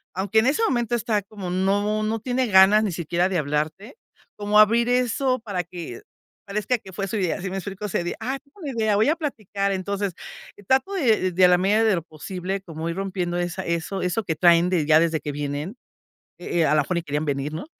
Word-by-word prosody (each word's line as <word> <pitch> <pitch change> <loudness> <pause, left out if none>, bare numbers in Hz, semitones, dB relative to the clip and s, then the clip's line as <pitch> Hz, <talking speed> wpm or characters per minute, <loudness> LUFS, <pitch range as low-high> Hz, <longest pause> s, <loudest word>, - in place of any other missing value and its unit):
aunque 195 +4 +2
en 220 - +2
ese 305 +12 +2
momento 240 -1 0
está 220 -2 0
como, 195 -2 -8
no 200 +3 +1
no 220 +1 -1
tiene 250 +2 -1
ganas 200 +1 +6
ni 210 - -1
siquiera 170 +2 0
de 190 - 0
hablarte, 155 - -2 0.4
como 210 +1 +2
abrir 230 +3 +5
eso 250 +1 +1
para 200 -6 -3
que 170 -8 -8 0.5
parezca 210 +5 -1
que 190 - -13
fue 195 +2 -3
su 215 - -3
idea, 185 -1 -1
¿sí 190 - -3
me 190 - -4
explico? 195 +1 -6
Así 195 - -1
de: 175 - -3
"Ah, 260 +4 -3
tengo 285 +8 -24
un 300 - -4
idea, 220 -2 +1
voy 215 +6 +3
a 315 - +3
platicar". 210 - -3
Entonces, 195 0 -2 0.5
trato 265 +9 +2
de 225 - +2
de 185 +1 +5
a - - +8
la 180 - +5
medida 205 +5 +2
de 220 -3 +3
lo 170 - -2
posible, 180 +4 -5
como 165 -2 -6
ir 165 - -3
rompiendo 185 -2 -2
esa 175 +1 -3
eso 170 +3 -2
eso 180 +5 -1
que 165 -5 -2
traen 170 +1 +4
de, 175 -5 +1
ya 155 +1 +6
desde 165 -1 +1
que 150 - -5
vienen, 145 +7 -4 0.6
e 175 -1 -2
eh, 160 - +4
a - - +3
la 150 - +4
mejor 180 +5 -3
ni 170 - -1
querían 150 -1 -2
venir, 140 +1 -2
¿no? 160 - -6
195 Hz, 230 wpm, -23 LUFS, 170-220 Hz, 0.6 s, a